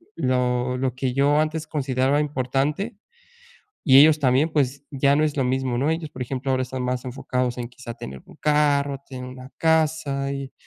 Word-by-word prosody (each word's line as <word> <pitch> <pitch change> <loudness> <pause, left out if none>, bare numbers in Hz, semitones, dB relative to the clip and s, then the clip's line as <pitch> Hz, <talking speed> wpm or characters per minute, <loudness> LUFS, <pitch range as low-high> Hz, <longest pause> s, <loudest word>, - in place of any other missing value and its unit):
lo 125 0 0
lo 130 -1 -1
que 130 -1 -2
yo 145 +2 +3
antes 155 0 -1
consideraba 135 -1 +1
importante 150 - -1 0.9
y 135 -3 +7
ellos 155 +1 +6
también, 135 +3 +3
pues 140 -2 0
ya 140 0 +2
no 150 - +2
es 150 -2 0
lo 135 - +1
mismo, 130 -1 0
¿no?, 145 +4 +1
ellos, 160 -2 -3
por 130 - -11
ejemplo, 130 +2 -3
ahora 130 0 +1
están 130 0 -5
más 125 0 -2
enfocados 125 -1 -2
en 120 -1 -4
quizá 125 -1 -9
tener 65 - -8
un - - -16
carro, 145 -2 +2
tener 130 -2 -7
una 130 +1 -10
casa 155 -4 +1
y 140 -1 -5
135 Hz, 185 wpm, -23 LUFS, 125-150 Hz, 0.9 s, y